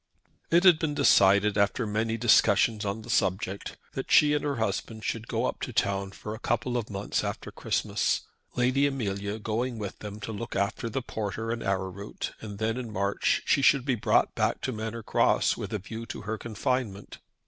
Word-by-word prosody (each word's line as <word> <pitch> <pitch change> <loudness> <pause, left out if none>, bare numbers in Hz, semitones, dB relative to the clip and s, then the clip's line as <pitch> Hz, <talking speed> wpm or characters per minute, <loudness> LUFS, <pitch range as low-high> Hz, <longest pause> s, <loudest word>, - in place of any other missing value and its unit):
It 170 +2 +4
had 180 -4 +7
been 150 -3 -1
decided, 100 -6 +5
after 100 +4 +2
many 110 +2 -1
discussions 110 -1 +4
on 100 +2 -3
the - - -12
subject, 95 0 -1 0.2
that - - -5
she 150 -1 +6
and 150 - 0
her 145 -1 -1
husband 110 0 -3
should 115 0 -3
go 115 +1 -1
up - - -2
to - - -3
town 100 -3 0
for 105 +2 -7
a 110 - -7
couple 120 +1 -1
of 120 -3 -2
months 100 -1 -2
after - - -4
Christmas, - - 0 0.3
Lady 130 +3 +3
Amelia 100 -6 -3
going 115 +3 -2
with 100 -3 -6
them 105 0 -7
to 110 - -5
look 115 +2 -6
after 100 +4 -1
the 130 +3 -3
porter 110 0 -3
and 115 0 -3
arrowroot, 95 +1 -3
and 105 -2 -7
that 110 +3 -1
in 120 -3 -6
March 100 0 0
she 140 - +3
should 135 -1 +4
be 135 - +2
brought 115 - +2
back - - 0
to 130 - -2
Manor 110 0 -5
Cross - - +2
with - - -6
a 110 - 0
view 110 +4 -7
to - - -6
her 110 +1 -4
confinement. 115 -2 -3
110 Hz, 195 wpm, -28 LUFS, 100-120 Hz, 0.3 s, had